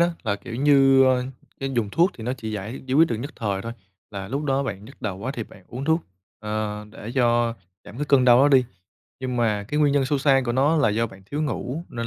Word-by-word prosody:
đó, 170 - +5
là, 100 -3 -1
kiểu 105 +3 -9
như, 135 -1 +5
ơ, 130 -1 +2 0.4
cái 135 0 -2
dùng 110 -4 0
thuốc 170 - +3
thì 110 - -9
nó 125 - -1
chỉ 110 -4 -6
giải 105 +5 -5
giải 130 - -1
quyết 165 +3 +5
được 115 - -1
nhất 130 +7 -5
thời 100 -3 -2
thôi, 115 - -5 0.4
là 100 -2 -6
lúc 140 +6 -3
đó 135 -1 +1
bạn 105 -7 -5
nhức 135 +6 -15
đầu 100 -4 -3
quá 115 +6 -4
thì 115 - -3
bạn 95 - -17
uống 125 +3 -6
thuốc, 160 +2 +2 0.4
ờ, 105 0 -3
để 110 +1 -8
cho 120 -2 +2 0.3
giảm 105 - -11
cái 150 - -2
cơn 140 -3 +4
đau 120 -1 +7
đó 145 - +5
đi, 135 -3 +5 0.6
nhưng 130 -1 -3
mà 110 -4 +1
cái 150 - 0
nguyên 145 -2 +4
nhân 140 -1 +2
sâu 140 +2 0
xa 135 -1 +4
của 120 - -1
nó 140 +6 +3
là 140 -7 +3
do 115 +2 0
bạn 95 -2 -14
thiếu 145 +7 -3
ngủ 145 +2 -3
nên 115 0 -4
125 Hz, 265 wpm, -24 LUFS, 110-140 Hz, 0.6 s, đau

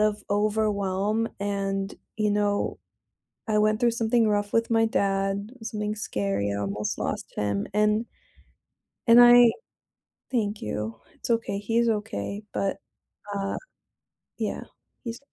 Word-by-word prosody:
of 210 -1 +1
overwhelm 210 0 +1
and, 195 -1 -2 0.2
you 210 -1 +1
know, 205 0 0 0.7
I 215 -1 +2
went 215 +1 +2
through 240 -1 +4
something 230 0 +2
rough 205 -1 0
with 230 0 +2
my 225 0 +4
dad, 195 0 0
something 210 -1 -3
scary, 100 - -1
I 100 - -2
almost 100 +1 -2
lost - - -4
him 100 -1 -1
and 210 +2 +2 1.0
and 230 +1 +9
I 240 -1 +8 0.8
thank 210 -4 -1
you. 110 +2 -4 0.2
It's - - -7
okay, 230 -3 0
he's 230 +3 +1
okay, 205 - -3
but, 195 - -1 0.6
uh, 195 0 -2 0.8
yeah, - - -2 0.4
he's 235 -1 -5
210 Hz, 125 wpm, -26 LUFS, 195-225 Hz, 1.0 s, and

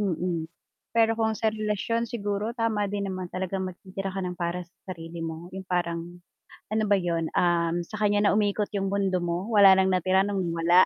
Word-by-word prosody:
Mm. 175 -4 -1 0.5
Pero 225 0 +4
kung 220 -1 +2
sa 220 -1 +2
relasyon 215 +2 -1
siguro 205 0 -2
tama 220 -3 +1
din 200 -1 -2
naman 185 -1 -4
talagang 190 +1 -2
magtitira 190 +2 -6
ka 195 - -2
ng 180 -1 -4
para 175 0 -2
sa 175 - -37 0.2
sarili 165 +1 -9
mo, 165 +2 -6
yung 190 -1 -7
parang, 175 -1 -2 0.5
ano 215 0 +1
ba 200 - +5
yun, 170 -3 -1
um, 170 -1 +2
sa 215 - -7
kanya 205 0 +3
na - - +4
umikot 210 0 +1
yung 195 -1 0
mundo 195 -2 +1
mo 175 +2 -1
wala 200 -3 +8
ng 190 0 +4
natira 185 +2 +3
nung 200 -2 -1
nawala? 170 +1 +4
190 Hz, 195 wpm, -27 LUFS, 175-205 Hz, 0.5 s, wala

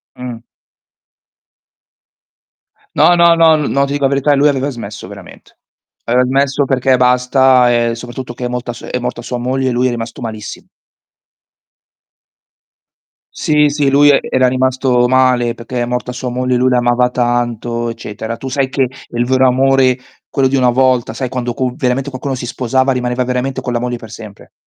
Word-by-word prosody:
Mh. 125 -2 -7 2.6
No, 175 - +5
no, 170 -1 +5
no, 165 -1 +5
no 140 -2 0
ti 140 - -4
dico 145 0 -2
la - - +3
verità, 140 +1 +2
lui 140 +2 +3
aveva 140 -1 0
smesso 120 -4 -8
veramente. - - -14 0.5
Aveva 125 +2 +2
smesso 135 +2 +1
perché 130 -1 +2
basta, 125 0 +3
ehm, 120 -1 +1
soprattutto 120 +1 -7
che 125 +1 -6
è - - 0
molta 125 0 -4
su 120 - -11
è - - -3
morta 125 -1 -4
sua 125 +1 -5
moglie 130 +2 -1
e - - -1
lui 125 +1 +1
è - - +1
rimasto 120 +1 -6
malissimo. 110 -3 -7 2.7
Sì, 150 -1 +2
sì, 145 -1 0
lui 145 +2 +5
e 140 - +5
era 130 -1 +3
rimasto 130 -1 +1
male 125 -2 +2
perché 120 +2 -5
è - - 0
morta 125 +1 -3
sua 125 0 -5
moglie, 125 +1 -1
lui 125 +1 +2
l'amava 125 0 +2
tanto, 120 -1 -1
eccetera. 115 0 -6
Tu 135 - -7
sai 130 0 -1
che 135 0 0 0.3
il 120 0 -1
vero 130 +1 +2
amore, 130 0 +3 0.3
quello 135 -1 +1
di 135 - -1
una 125 -2 +3
volta, 125 -2 +1
sai 130 +2 -4
quando 125 -1 -3
co 130 0 -2
veramente 130 +1 -1
qualcuno 135 +1 -4
si 125 -1 -6
sposava 130 +2 0
rimaneva 125 0 -1
veramente 125 +1 -2
con 125 - -4
la 120 - 0
moglie 125 0 -3
per 115 -1 -12
sempre. 110 -3 -12
125 Hz, 175 wpm, -15 LUFS, 120-135 Hz, 2.7 s, No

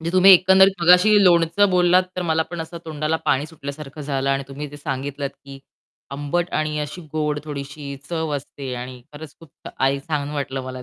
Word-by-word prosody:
म्हणजे 165 +1 -4
तुम्ही 185 +1 +7
एकंदरीत 190 +2 +6
मगाशी 180 +5 +6
लोणचं 175 +3 +4
बोललात 180 0 +4
तर 180 - -1
मला 160 -2 +1
पण 175 -1 -5
असं 165 +1 -7
तोंडाला 155 0 -2
पाणी 140 +3 +1
सुटल्यासारखं 150 -2 -9
झालं 140 -1 -1
आणि 135 0 0
तुम्ही 140 +2 -6
जे 145 - -11
सांगितलत 140 -1 -4
की 135 0 -10 0.5
आंबट 145 +6 -2
आणि 155 0 -1
अशी 150 +4 -6
गोड 150 -1 -1
थोडीशी 140 -1 -7
चव 160 -3 -2
असते 135 -2 -7
आणि 125 +1 -7
खरंच 150 -1 -10
खूप 165 -4 -14
आई 135 +1 +2
छान 145 -2 -2
वाटलं 140 -2 -4
मला 130 0 -7
150 Hz, 185 wpm, -21 LUFS, 140-170 Hz, 0.5 s, तुम्ही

